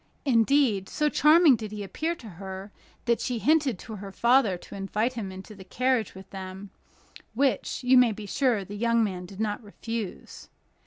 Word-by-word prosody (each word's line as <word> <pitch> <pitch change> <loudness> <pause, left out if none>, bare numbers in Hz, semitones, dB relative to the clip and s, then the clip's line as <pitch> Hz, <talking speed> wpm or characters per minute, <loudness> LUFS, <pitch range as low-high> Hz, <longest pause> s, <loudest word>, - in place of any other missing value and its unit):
Indeed, 235 -5 +3
so 300 0 +1
charming 305 -1 +6
did 215 -2 -6
he 210 -1 -5
appear 320 - -3
to 240 - -12
her, 190 +1 -8 0.3
that 235 -1 +1
she 250 -2 -2
hinted 280 0 +2
to 220 +3 -9
her 195 0 -8
father 235 -3 +3
to - - -14
invite 210 +5 -1
him 215 -6 -5
into 190 +3 -10
the 195 -2 -12
carriage 250 +1 0
with 190 0 -11
them, 190 0 -8 0.6
which, 270 0 0
you 255 +1 +6
may 245 -2 +5
be 215 0 -7
sure 225 -2 +1
the 205 - -8
young 230 +1 +2
man 180 -4 -3
did 195 +2 -12
not 215 +1 -2
refuse. 220 0 -7
220 Hz, 180 wpm, -27 LUFS, 195-255 Hz, 0.6 s, charming